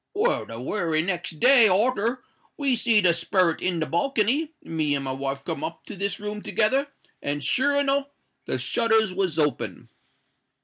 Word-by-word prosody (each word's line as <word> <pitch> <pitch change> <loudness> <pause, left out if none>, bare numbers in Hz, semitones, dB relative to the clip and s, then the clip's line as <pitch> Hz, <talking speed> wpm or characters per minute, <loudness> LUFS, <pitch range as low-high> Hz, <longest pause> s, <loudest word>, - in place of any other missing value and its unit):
Well, 445 +4 0
the 115 - -8
wery 160 +2 0
next 175 -3 -3
day 250 -3 +7
arter 230 +4 +1 0.3
we 275 -3 +1
see 230 -2 +3
the 180 -3 +4
sperret 170 0 +1
in 180 -2 -1
the 160 - 0
balcony, 270 - 0
me 155 -3 -1
and 140 -1 -3
my 130 - -3
wife 135 +1 -4
come 165 - -4
up 165 - -6
to - - -7
this 200 +1 -2
room 210 0 -5
together, 265 +9 +1 0.3
and 145 0 -2
sure 285 +3 +1
enow 280 0 0 0.4
the - - 0
shutters 220 -4 +2
was 185 -4 -1
open!" 150 -5 -1
200 Hz, 170 wpm, -24 LUFS, 160-245 Hz, 0.4 s, day